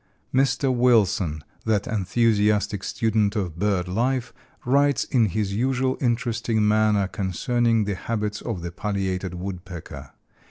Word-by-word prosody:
149 135 0 +2
Mr. - - -1
Wilson, 105 -10 +2 0.2
that 110 -3 +1
enthusiastic 105 -1 +1
student 110 -1 0
of 90 -6 -3
bird 100 -3 0
life, 125 +6 -1 0.3
writes 140 +1 +3
in 120 -4 +2
his 100 0 -2
usual 130 +3 0
interesting 115 -3 0
manner 105 -2 +3
concerning 115 +5 0
the 100 0 -2
habits 105 +1 -3
of 105 -8 -4
the 85 - -4
Pileated 95 -2 -3
Woodpecker. 90 -2 -7
105 Hz, 125 wpm, -24 LUFS, 95-120 Hz, 0.3 s, writes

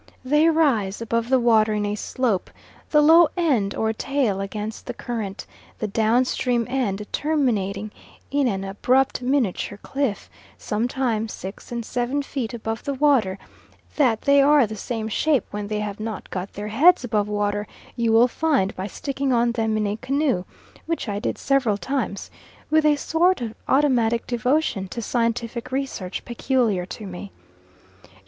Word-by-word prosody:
They 300 +5 +4
rise 255 -12 +2
above 230 +1 -1
the 260 -1 +4
water 220 -3 +3
in 210 0 -1
a 205 - -1
slope, 215 -1 -1 0.4
the 300 -1 +4
low 325 +2 +7
end 255 - +1
or 220 0 0
tail 235 -5 -1
against 210 +2 -5
the 245 - -4
current; 220 -6 -5 0.3
the - - -3
down 225 +4 +2
stream 245 -2 0
end 220 -6 -1
terminating 215 -9 0 0.4
in 280 -1 +2
an 195 -4 -1
abrupt 250 +8 +1
miniature 245 -6 0
cliff, 270 -7 -2 0.3
sometimes 225 0 -1
six 190 +5 -9
and 235 -1 -3
seven 250 +5 -1
feet 265 -5 -4
above 225 -1 -4
the 280 - -2
water; 260 -9 +2 0.6
that 245 -7 +2
they 280 0 +5
are 285 -1 +5
the 215 0 -6
same 220 +1 -4
shape 280 +5 +1
when 205 0 -4
they 210 0 -2
have 210 -1 -4
not 215 -1 -6
got 185 +1 -5
their 210 +1 -5
heads 320 +11 +5
above 210 -4 0
water 205 0 -1 0.3
you 230 -1 +1
will 230 +2 +6
find 265 -8 0
by 190 +1 -4
sticking 275 +5 -3
on 240 -1 +3
them 220 -2 0
in 215 - 0
a 205 +1 -2
canoe, 260 -7 0 0.4
which 330 -6 -2
I 205 -1 -2
did - - -2
several 265 -7 +1
times, 255 -4 -3 0.4
with 310 0 +4
a 300 - +5
sort 340 +5 +2
of 230 -3 -4
automatic 245 -5 +2
devotion 250 -4 0
to 235 - -5
scientific 235 +1 -2
research 260 -9 -4
peculiar 235 -7 0
to 215 - -8
me. 190 +1 -8
235 Hz, 160 wpm, -23 LUFS, 210-270 Hz, 0.6 s, low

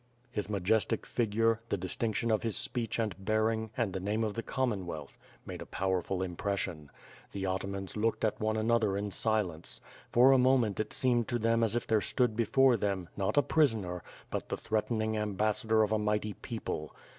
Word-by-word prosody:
His 105 -3 -3
majestic 105 +1 +1
figure, 115 0 +1
the 100 - 0
distinction 110 +5 -1
of 110 - +2
his 115 -3 -1
speech 120 -2 -2
and 105 -4 -2
bear 110 +2 +2
ing 110 0 -3
and 115 -6 0
the 95 - -2
name 105 +4 -1
of 105 -2 -1
the 115 - -3
Commonwealth 95 - -3 0.3
made - - -7
a - - -6
powerful 95 0 -1
im 90 -2 -4
pression. 90 -7 -3 0.4
The 100 - -4
atamans 95 0 -3
looked 110 +1 +1
at 110 - -1
one 110 0 0
another 110 -3 +2
in 100 0 -3
silence. 105 -8 -1 0.3
For 125 +3 +7
a 135 - +6
moment 125 -5 +3
it 110 - -2
seemed 120 -3 +2
to 120 - 0
them 115 0 +2
as 110 0 +2
if 120 - -1
there 110 -1 +2
stood 120 -1 +1
before 125 +2 +4
them, 95 -4 -2
not 100 +5 -1
a 145 - +6
prisoner, 110 - +1 0.3
but - - -3
the - - -2
threatening 110 0 -1
ambassador 110 +1 +1
of 105 - -1
a 110 - +2
mighty 105 0 0
peo 115 +2 -6
ple. 75 0 -4
110 Hz, 190 wpm, -31 LUFS, 100-115 Hz, 0.4 s, For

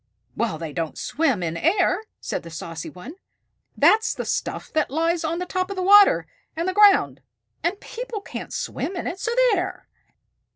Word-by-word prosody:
"Well, 225 -9 -1
they 160 -2 -6
don't 165 0 -3
swim 275 - 0
in 165 -1 -2
air," 365 - +2 0.2
said - - -4
the 165 - -11
saucy 165 0 -7
one. 185 - -10 0.6
"That's 445 +1 +4
the - - -4
stuff - - -3
that 310 -1 +1
lies 330 +4 0
on 325 +2 -2
top 370 +1 -2
of 395 - -4
the 370 - -2
water 405 +2 +7 0.3
and 335 +3 -2
the 375 - 0
ground, 410 0 +5 0.4
and 360 +4 -1
people 480 -2 -6
can't - - -8
swim 375 - -4
in 350 - -4
it. 365 - -4
So 445 - -2 0.2
there!" 365 -2 -3
340 Hz, 175 wpm, -23 LUFS, -, 0.6 s, water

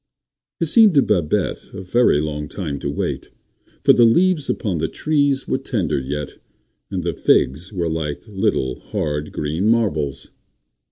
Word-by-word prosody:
It 165 - +1
seemed 210 +2 +5
to 140 - +6
Babette 85 -7 0
a - - -6
very 105 -4 +3
long 75 -1 -4
time 75 -5 -5
to 70 - -3
wait; 70 - -3 0.5
for - - +7
the 120 - +5
leaves 165 +6 +3
upon 95 -7 -1
the 80 - 0
trees 145 - 0
were - - 0
tender - - -1
yet, 70 +2 -5 0.5
and 95 -3 -3
the 85 -1 -1
figs 75 - +1
were 90 -4 -2
like 80 -3 -3
little 95 -10 -1
hard, 75 -1 -3
green 80 +7 -2
marbles. 100 - 0
85 Hz, 155 wpm, -20 LUFS, 75-115 Hz, 0.5 s, for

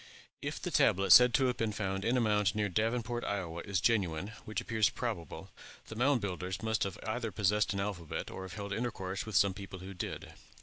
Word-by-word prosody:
If - - -4
the - - -4
tablet 95 +1 +3
said 125 0 +10
to 135 - +3
have 125 -1 0
been 115 -1 0
found 95 -3 -2
in 120 +4 +2
a - - +3
mound 105 -4 +2
near 105 -1 0
Davenport, 115 +4 -1
Iowa, 85 -4 -3
is 95 -2 -1
genuine, 95 -4 +1 0.2
which 110 - -3
appears 110 -2 +2
probable, 105 - -5 0.4
the 115 - -7
Mound 125 +1 +2
Builders 95 0 -4
must 110 -2 +1
either 110 +5 -4
have 105 - -8
possessed 105 +1 +2
an 100 - -1
alphabet, 95 -6 -4
or - - -7
have 95 -2 -7
held 100 -1 -4
intercourse 100 -2 -3
with 110 - -5
some 100 0 +4
people 95 0 -8
who 95 +2 -8
did. 90 - -6
105 Hz, 210 wpm, -32 LUFS, 95-115 Hz, 0.4 s, said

